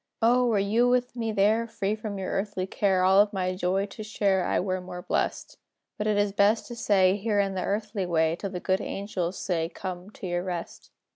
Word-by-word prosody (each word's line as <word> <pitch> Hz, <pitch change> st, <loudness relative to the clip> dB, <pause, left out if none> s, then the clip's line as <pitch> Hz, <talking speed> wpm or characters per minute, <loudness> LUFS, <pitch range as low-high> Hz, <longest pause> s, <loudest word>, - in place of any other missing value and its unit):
O! 245 Hz, +2 st, +4 dB
were 225 Hz, -3 st, +2 dB
you 215 Hz, +5 st, +2 dB
with 250 Hz, 0 st, +1 dB
me 225 Hz, -2 st, -2 dB
there, 215 Hz, +3 st, +2 dB
Free 205 Hz, -2 st, -2 dB
from 215 Hz, -2 st, -5 dB
your 190 Hz, -1 st, -4 dB
earthly 195 Hz, -2 st, -2 dB
care, 190 Hz, -1 st, +1 dB
All 190 Hz, +1 st, +5 dB
of 205 Hz, 0 st, +1 dB
my 185 Hz, -1 st, -1 dB
joy 185 Hz, +2 st, 0 dB
to 205 Hz, +2 st, -10 dB
share, 200 Hz, -3 st, +1 dB
I -, -, +1 dB
were 185 Hz, 0 st, -1 dB
more 180 Hz, -1 st, -8 dB
blest. -, -, -2 dB, 0.4 s
But 210 Hz, -, -1 dB
it 210 Hz, -1 st, +2 dB
is 205 Hz, 0 st, +2 dB
best 205 Hz, +3 st, +3 dB
to 240 Hz, -, -6 dB
stay 200 Hz, -4 st, +3 dB
Here 210 Hz, 0 st, 0 dB
in 195 Hz, -1 st, +1 dB
the 185 Hz, -1 st, -2 dB
earthly 205 Hz, -2 st, -2 dB
way, 160 Hz, -1 st, +2 dB
Till 195 Hz, +3 st, -5 dB
the 180 Hz, -2 st, -5 dB
good 190 Hz, +1 st, 0 dB
angels 190 Hz, -3 st, -3 dB
say, 165 Hz, -3 st, -1 dB
"Come 180 Hz, +1 st, -7 dB
to 210 Hz, -, -10 dB
your 175 Hz, -1 st, -1 dB
rest!" 175 Hz, -2 st, -6 dB
195 Hz, 220 wpm, -27 LUFS, 185-215 Hz, 0.4 s, All